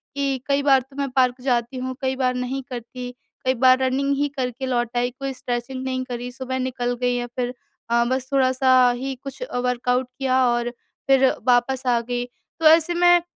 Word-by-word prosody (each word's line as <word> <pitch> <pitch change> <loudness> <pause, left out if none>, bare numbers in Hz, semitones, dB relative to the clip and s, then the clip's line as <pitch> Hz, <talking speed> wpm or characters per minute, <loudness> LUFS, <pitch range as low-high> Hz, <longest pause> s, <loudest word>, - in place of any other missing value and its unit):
कि 275 -1 0
कई 280 0 +2
बार 270 -2 +5
तो 270 +2 -19
मैं 280 -1 -2
पार्क 255 -1 +2
जाती 245 0 0
हूँ, 255 0 -4
कई 265 0 0
बार 255 -1 +1
नहीं 250 +2 -3
करती, 245 0 -7 0.3
कई 260 - +3
बार 255 +1 +5
रनिंग 265 +2 0
ही 290 - +1
करके 250 0 -3
लौट 240 -2 -1
आई, 245 0 +1
कोई 275 0 -3
स्ट्रेचिंग 255 +1 -4
नहीं 260 0 -2
करी, 245 -1 -5
सुबह 260 0 -4
निकल 250 -1 -2
गई 245 0 +2
या 245 0 -2
फिर 245 0 -1 0.4
अ, 235 0 +3
बस 260 0 -2
थोड़ा-सा 255 -1 +4
ही 265 +2 -4
कुछ 275 - -8
अ, - - -5
वर्कआउट 250 0 0
किया 260 -1 +2
और 240 0 0 0.4
फिर 270 -1 +5 0.2
वापस 255 +1 +2
आ 240 -1 +3
गई। 245 +1 -3 0.3
तो 325 - -2
ऐसे 325 +2 +5
मैं 350 0 +5
255 Hz, 200 wpm, -23 LUFS, 245-270 Hz, 0.4 s, बार